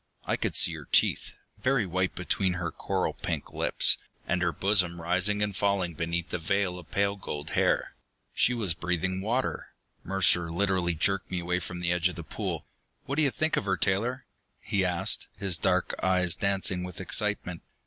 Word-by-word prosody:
I - - +1
could - - -2
see - - +5
her - - -8
teeth, - - +3 0.3
very 130 0 +2
white 95 +1 -1
between 90 +1 0
her 85 -2 -3
coral - - -1
pink - - -4
lips, - - +3 0.3
and 90 +1 0
her 85 -1 +2
bosom 90 0 +3
rising 95 +5 +1
and 100 -2 -2
falling 95 -3 +1
beneath 85 +1 -2
the - - -2
veil 90 +2 0
of 85 - -14
pale 100 0 +1
gold 75 -7 -6
hair. - - +1 0.4
She 125 - +2
was 105 -8 +1
breathing 90 +2 -1
water! 120 +6 -2 0.3
Mercer 90 -3 +2
literally 90 -1 +1
jerked 95 +4 0
me 90 - -2
away 90 +1 0
from 90 0 -6
the 85 -1 +1
edge 90 +1 +2
of 90 - -7
the 85 - -6
pool. - - -4 0.4
"What 140 - -3
do - - +4
you 145 - +4
think 155 +4 0
of - - -1
her, 95 -2 +1
Taylor?" 115 +9 0 0.3
he 100 -2 0
asked, 95 +3 +2
his 95 -3 +1
dark 90 -1 +1
eyes 90 -2 +2
dancing 95 -2 +1
with 90 -1 -7
excitement. 95 -2 -1
95 Hz, 185 wpm, -28 LUFS, 85-100 Hz, 0.4 s, see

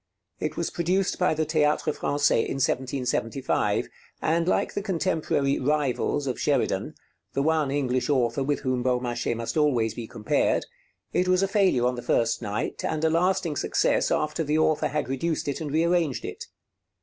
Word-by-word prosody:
It - - -3
was - - -1
produced 180 +3 0
by 180 -3 +2
the 155 0 0
Théâtre 150 -1 +1
Français 145 0 +2
in - - -3
1775, 130 -1 0 0.3
and 165 +2 +1
like - - +1
the 205 - -2
contemporary 165 -7 0
'Rivals' 145 0 0
of 130 -3 -3
Sheridan, - - 0 0.4
the 140 - 0
one 155 -2 +2
English 130 -2 0
author 130 -1 +1
with 145 +1 -1
whom 130 -2 0
Beaumarchais 125 -1 -1
must 115 +2 -4
always 125 -8 +2
be 115 -1 -6
compared, 110 -2 0 0.5
it 180 - +2
was 185 +1 +3
a - - +2
failure 190 - +2
on 125 - +2
the 120 - -5
first 115 0 +1
night 105 +4 -3
and 155 0 -2
a 160 - +3
lasting 180 -1 +1
success - - +1
after 155 +2 0
the 150 +1 0
author 155 -1 +2
had 150 -2 -2
reduced 150 +5 -2
it 140 +3 -2
and 155 - -3
rearranged 165 -2 +1
it. - - -6
145 Hz, 170 wpm, -26 LUFS, 125-160 Hz, 0.5 s, was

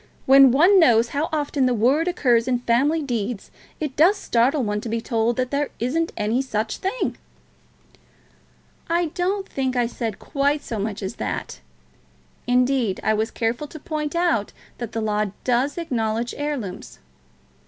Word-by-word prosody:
when 270 0 +8
one 345 +10 +5
knows 235 -7 +4
how 295 +3 -2
often 290 -3 0
the 250 - +1
word 265 +10 +2
occurs 245 -9 +2
in 250 -1 +2
family 280 +7 +2
deeds, 235 -5 -3 0.3
it 300 -4 -4
does 360 +7 +5
startle 260 -1 +1
one 210 -1 -2
to 230 - -6
be 230 +1 -1
told 230 0 0
that 255 -1 -1
there 285 0 0
isn't 320 +8 -1
any 220 +4 0
such 220 -4 -2
thing." 400 +6 -2 1.7
"I 340 -1 +1
don't 385 +2 -1
think 260 -1 -2
I 245 -1 +2
said 230 -3 -4
quite 285 +1 -1
so 225 - -4
much 205 0 -3
as 190 - -5
that. 105 -5 -4 0.9
Indeed, 250 -4 +2
I 215 - +2
was 220 +2 0
careful 235 +5 -2
to 310 - -10
point 300 +1 -4
out 335 - +1 0.3
that 240 -2 -5
the 225 - -2
law 210 -1 0 0.2
does 255 +4 +1
acknowledge 235 -7 -2
heirlooms." 285 -11 -5
250 Hz, 160 wpm, -23 LUFS, 225-295 Hz, 1.7 s, when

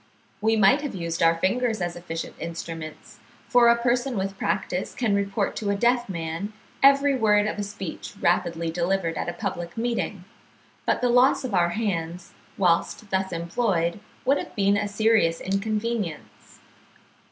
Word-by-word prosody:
We 220 +1 +3
might 215 +7 +5
have 290 -8 -4
used 170 -2 -3
our 165 0 +5
fingers 220 +5 0
as 175 -1 -2
efficient 165 -1 -6
instruments, 165 -1 -7 0.3
for 245 -1 +5
a 235 - +7
person 240 +1 0
with 195 0 -2
practice 190 -1 -2
can 230 -5 0
report 200 0 0
to 205 - -2
a 200 - +2
deaf 240 +2 +2
man 170 +3 -4 0.3
every 275 0 +5
word 210 -4 +3
of 215 - -3
a - - -1
speech 195 -2 -7
rapidly 170 -2 +1
delivered 170 0 0
at - - -2
a - - -4
public 175 -2 -5
meeting; 225 -5 -2 0.6
but - - +2
the 250 - +2
loss 250 +3 +4
of 250 -5 -4
our 175 -2 +3
hands, 175 -4 -3 0.3
whilst 190 +3 +1
thus 190 0 0
employed, 170 +1 0 0.3
would 275 +3 +3
have - - -8
been 200 -1 +3
a 205 0 0
serious 205 -5 +2
inconvenience. 210 -2 -3
200 Hz, 160 wpm, -25 LUFS, 170-225 Hz, 0.6 s, a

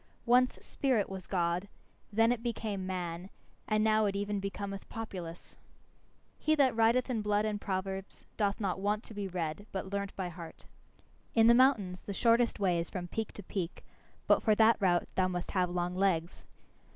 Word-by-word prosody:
Once 250 +1 +4
spirit 250 -8 0
was 190 -1 -7
God, 175 +1 0 0.4
then 225 +2 +4
it 245 -2 -1
became 215 -5 -3
man, 180 -1 -4 0.4
and 215 0 +2
now 215 0 +3
it 200 - -2
even 205 0 -1
becometh 195 0 -5
populace. 180 -7 -7 0.8
He 310 - +2
that 270 -5 +3
writeth 230 +2 +3
in 240 -4 -1
blood 210 0 +1
and 210 -1 -2
proverbs 190 0 -4
doth 205 -2 0
not 190 -3 -1
want 205 +3 0
to - - -11
be 205 -1 -3
read, 180 +2 -4
but 190 0 -4
learnt 200 -1 -3
by 185 -2 -3
heart. 165 -1 -10 0.7
In 225 -1 +6
the 235 - +8
mountains 235 -8 +3
the 200 - -6
shortest 235 +2 +3
way 180 -4 +2
is 170 - -3
from 175 -2 -5
peak 220 +2 -3
to 205 - -9
peak, 180 -2 -4 0.4
but - - +4
for 215 - +3
that 225 +1 +5
route 180 -4 +2
thou 185 -1 +2
must 180 -1 -4
have 180 -2 +1
long 175 0 -1
legs. 180 -3 0
200 Hz, 180 wpm, -32 LUFS, 185-220 Hz, 0.8 s, the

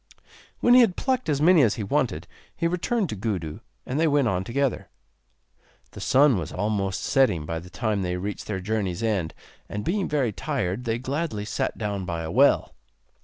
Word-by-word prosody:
When 240 - +5
he 250 - +9
had 220 -7 +3
plucked 260 -7 -1
as 145 -2 +1
many 175 -1 +6
as 115 -6 +3
he 110 - -4
wanted 105 - -1 0.3
he - - -2
returned 180 +5 0
to - - -3
Gudu, 95 -7 -3 0.3
and 130 +4 -2
they 165 - +3
went 145 -4 +3
on 95 -3 0
together. 135 +5 -1 1.0
The - - -10
sun 135 -5 +4
was 80 - -5
almost 100 -1 -1
setting 110 - +2
by 80 +1 -3
the 90 +2 -12
time 110 -1 -1
they 90 -1 -2
reached 100 +3 -5
their 100 -3 -2
journey's 100 -1 -2
end 100 -8 -1 0.3
and 105 0 -4
being 195 +2 0
very 140 -6 +1
tired 95 +5 -3
they 115 0 0
gladly 130 -4 -3
sat - - -2
down 100 -3 -3
by 85 -2 -3
a 80 - -4
well. - - +3
110 Hz, 190 wpm, -25 LUFS, 95-145 Hz, 1.0 s, he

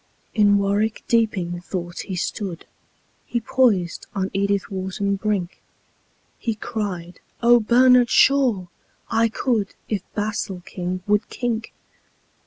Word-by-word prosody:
In 205 -2 +5
warwick 205 +2 0
deeping 190 -7 +1
thought 175 -1 -5
he 190 - -4
stood 180 -1 -4 0.6
He 240 - -1
poised 225 -8 +1
on 190 0 -1
edithwharton 200 0 -1
brink; 200 -4 -2 0.8
He 230 -2 -2
cried, 185 -5 -5 0.2
"Ohbernardshaw! 240 -1 +5 0.4
I 230 0 +3
could 220 -4 -1
If 210 -4 -1
basilking 185 -3 -3
would 210 +1 +1
kink." 230 -2 -3
205 Hz, 95 wpm, -22 LUFS, 185-230 Hz, 0.8 s, In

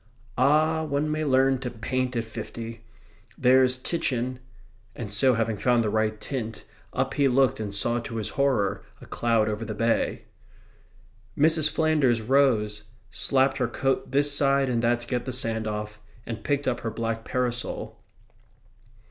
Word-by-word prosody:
"Ah, 155 +4 +3
one 150 0 -1
may 155 0 -1
learn 135 -2 +3
to 125 -1 -4
paint 125 +2 -2
at 115 - 0
fifty! 115 0 -8 0.5
There's 130 0 +4
Titian..." 130 -4 -2 0.6
and 105 -4 -6
so, 130 +3 +4
having 115 -1 -1
found 120 +1 +2
the 105 - -1
right 110 0 0
tint, 115 -5 -5 0.3
up 130 +1 -1
he 140 -1 +3
looked 130 -2 +2
and 105 -2 -4
saw 120 +4 +1
to 115 0 -7
his 110 -2 -2
horror 130 -8 0 0.2
a - - -12
cloud 115 -2 +1
over 105 +1 -3
the 110 -1 -5
bay. 115 +2 0 1.1
Mrs. 155 +1 +4
Flanders 150 -7 +2
rose, 110 -4 +2 0.3
slapped 135 +2 +1
her 125 - +1
coat 135 +3 -1
this 145 +1 +2
side 140 -1 +2
and 120 -2 0
that 120 0 +1
to 120 - -11
get 125 -1 -2
the 130 - -3
sand 115 -3 -1
off, 105 0 -5 0.2
and 115 -2 -6
picked 140 -1 -1
up 125 -2 0
her 115 - -3
black 115 0 -3
parasol. 120 -1 -3
125 Hz, 160 wpm, -26 LUFS, 115-135 Hz, 1.1 s, There's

